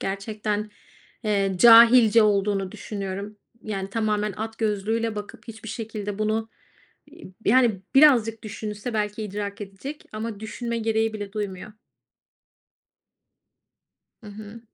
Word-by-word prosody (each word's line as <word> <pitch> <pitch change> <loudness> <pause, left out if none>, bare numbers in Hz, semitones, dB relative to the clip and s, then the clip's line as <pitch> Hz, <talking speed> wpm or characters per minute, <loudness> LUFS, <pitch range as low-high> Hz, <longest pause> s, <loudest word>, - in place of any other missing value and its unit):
gerçekten, 210 +1 -3 0.5
eee 200 -2 +1
,cahilce 230 0 +8
olduğunu 200 -2 +1
düşünüyorum. 200 0 -6 0.3
Yani, 195 -2 -4
tamamen 210 -1 -1
at 225 +1 -6
gözlüğüyle 220 +1 -1
bakıp 210 +3 -9
hiçbir 225 0 -9
şekilde 215 -2 -5
bunu, 220 +1 -1 0.6
iii, 185 - -14
yani, 230 -4 +3
birazcık 240 -6 +5
düşünse 215 +1 -6
belki 210 0 -2
idrak 205 0 -5
edecek 205 +10 -8
ama 215 -1 -5
düşünme 235 +2 -4
gereği 225 0 0
bile 205 -2 -6
duymuyor. 205 -2 -5 2.5
Hı - - -13
hı. 215 +2 -10
215 Hz, 110 wpm, -24 LUFS, 205-225 Hz, 2.5 s, cahilce